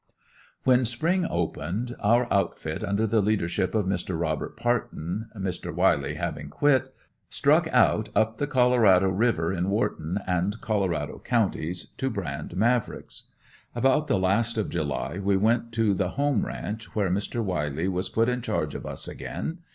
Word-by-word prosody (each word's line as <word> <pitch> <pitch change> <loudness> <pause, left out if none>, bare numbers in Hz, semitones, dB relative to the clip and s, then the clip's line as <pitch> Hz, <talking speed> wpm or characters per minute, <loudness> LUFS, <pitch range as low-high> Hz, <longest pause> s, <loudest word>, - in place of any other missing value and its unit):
When 130 -1 +4
spring 165 +10 +1
opened, 85 +8 -2
our 120 +4 +3
outfit, 95 -4 -1
under 100 +3 +1
the 110 0 +2
leadership 95 -2 0
of 105 -3 +2
Mr. 90 -2 -2
Robert 80 +3 -2
Partin, 115 -4 -2
Mr. 90 -2 -3
Wiley 80 -5 +2
having 75 -1 -4
quit, 130 - +2 0.4
struck - - +3
out - - +3
up 110 +2 +1
the 145 - 0
Colorado 120 -8 +4
river 95 -4 +1
in 90 -1 -1
Whorton 95 -4 -1
and 90 +4 0
Colorado 90 -9 -1
counties 90 -7 -1
to 135 - 0
brand 85 - -5
Mavricks. 120 +3 0 0.5
About 135 +5 +2
the - - +2
last 105 +5 +1
of 110 - -1
July 80 +2 -2
we 100 0 +2
went 115 +3 +1
to 110 -3 +2
the 90 -1 0
"home" 140 -1 0
ranch, 110 +1 -6
where 100 -4 +1
Mr. 105 +5 -1
Wiley 80 -3 -1
was 90 -1 -2
put 115 +1 +2
in 125 0 0
charge - - -2
of - - -6
us - - -1
again. 165 +2 -5
100 Hz, 155 wpm, -26 LUFS, 90-120 Hz, 0.5 s, When